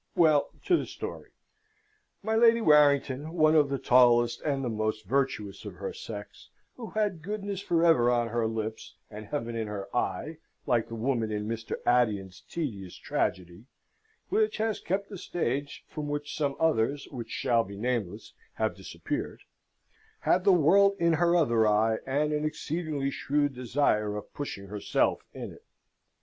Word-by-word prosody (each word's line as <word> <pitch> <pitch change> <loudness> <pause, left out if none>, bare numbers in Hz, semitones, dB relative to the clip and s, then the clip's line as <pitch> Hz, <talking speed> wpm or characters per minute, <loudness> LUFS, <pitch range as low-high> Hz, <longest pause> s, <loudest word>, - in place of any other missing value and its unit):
Well, 155 -5 +4 0.2
to 360 - +4
the - - -4
story. - - -7 0.9
My 220 +2 0
Lady 230 0 +6
Warrington, 150 - +3
one 155 -2 +4
of 150 -3 +4
the 140 - -1
tallest 120 -2 +4
and 140 -3 -1
the - - -1
most 110 -1 -2
virtuous 115 -4 -1
of 100 -4 -8
her 95 +2 -5
sex, 105 -2 -9 0.3
who 230 -3 -8
had 205 -6 -1
goodness 200 +1 -4
for 170 -4 +2
ever 140 -8 +5
on 120 -1 +1
her 115 0 0
lips 110 0 -5 0.2
and 105 0 -8
"Heaven 120 -6 -3
in 110 -1 -2
her 100 0 -6
eye," 125 - -2 0.3
like 115 -2 +1
the 115 - -7
woman 115 -1 -1
in 105 0 -3
Mr. 115 0 -4
Addison's 100 -7 +1
tedious 105 - -4
tragedy 90 +3 -3 0.6
(which 430 +2 +1
has 220 -1 -1
kept 195 +3 -2
the 200 -4 -8
stage, 140 -5 -3
from 150 -2 -5
which 145 0 -4
some 140 -2 -1
others, 140 -3 +1
which 120 -5 -7
shall 115 -1 +1
be 100 -1 -9
nameless, 115 -4 -3 0.2
have - - -1
disappeared), - - -5 0.8
had 185 +1 +2
the 200 - +7
world 195 +4 +5
in 170 -1 +3
her 170 +2 +3
other 115 -10 +3
eye, 110 +1 +2
and 150 +3 +1
an 150 0 -1
exceedingly 155 -2 -2
shrewd 145 +1 0
desire 120 -5 0
of 105 - -9
pushing 120 -9 -5
herself 105 0 0
in - - -6
it. - - -17
135 Hz, 160 wpm, -28 LUFS, 110-160 Hz, 0.9 s, the